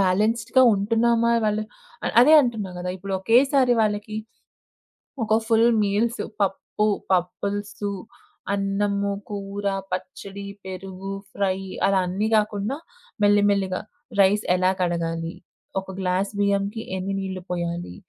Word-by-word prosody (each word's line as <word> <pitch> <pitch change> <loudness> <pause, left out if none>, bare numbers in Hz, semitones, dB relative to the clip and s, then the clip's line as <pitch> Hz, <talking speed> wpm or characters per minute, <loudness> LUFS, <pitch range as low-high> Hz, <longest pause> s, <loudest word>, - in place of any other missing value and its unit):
బ్యాలెన్స్‌డ్‌గా 220 +7 +3
ఉంటున్నామా 230 +3 +2
ఇవాళ 215 -2 +1 0.5
అ - - 0
అదే 280 +6 +7
అంటున్నా 220 -6 -2
గదా! 180 +1 -3
ఇప్పుడొకేసారి 235 +8 +3
వాళ్ళకి, 215 0 -1 1.1
ఒక 215 -1 +1
ఫుల్ 225 0 +5 0.2
మీల్స్, 215 +4 0 0.2
పప్పు, 195 +2 0 0.3
పప్పల్సు, 200 +3 -1 0.6
అన్నము, 200 0 0 0.2
కూర, 200 0 -5 0.3
పచ్చడి, 200 0 -6 0.2
పెరుగు, 190 +1 -7 0.2
ఫ్రై, 190 -2 0 0.3
అలా 195 0 +3
అన్నీ 195 +4 -1
గాకుండా, 210 +4 0 0.5
మెల్లిమెల్లిగా 205 -2 +3 0.4
రైస్ 200 +2 +3
ఎలా 185 0 +3
కడగాలి, 165 -1 -1 0.5
ఒక 190 - -10
గ్లాస్ 190 +1 0
బియ్యంకి 200 +2 0 0.2
ఎన్ని 190 +1 -3
నీళ్ళు 190 -1 -5
పొయ్యాలి, 170 - -3
200 Hz, 105 wpm, -24 LUFS, 190-215 Hz, 1.1 s, అదే